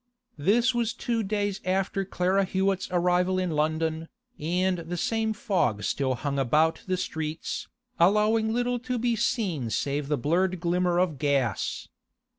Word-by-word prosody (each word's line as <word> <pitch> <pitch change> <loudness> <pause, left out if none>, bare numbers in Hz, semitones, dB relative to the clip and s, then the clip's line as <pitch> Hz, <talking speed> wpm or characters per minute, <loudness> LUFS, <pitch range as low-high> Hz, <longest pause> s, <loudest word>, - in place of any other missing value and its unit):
This 230 - +3
was 235 0 -1
two 235 -2 -1
days 205 -1 -2
after 190 +1 0
Clara 185 +1 +1
Hewett's 190 0 0
arrival 180 +1 +2
in 185 -2 0
London, 160 +1 -1 0.3
and 180 +3 0
the 170 +1 -5
same 220 +4 0
fog 185 - 0
still 130 -2 0
hung 140 +2 -2
about 155 +5 +2
the 185 0 0
streets, 160 -2 -4 0.3
allowing 215 +5 +3
little 245 +1 0
to 250 +1 -3
be 240 0 +1
seen 190 - -1
save 140 +5 -1
the 150 0 0
blurred 175 +7 +1
glimmer 175 0 +1
of 175 -6 +1
gas. 135 -7 0
180 Hz, 145 wpm, -27 LUFS, 155-210 Hz, 0.3 s, This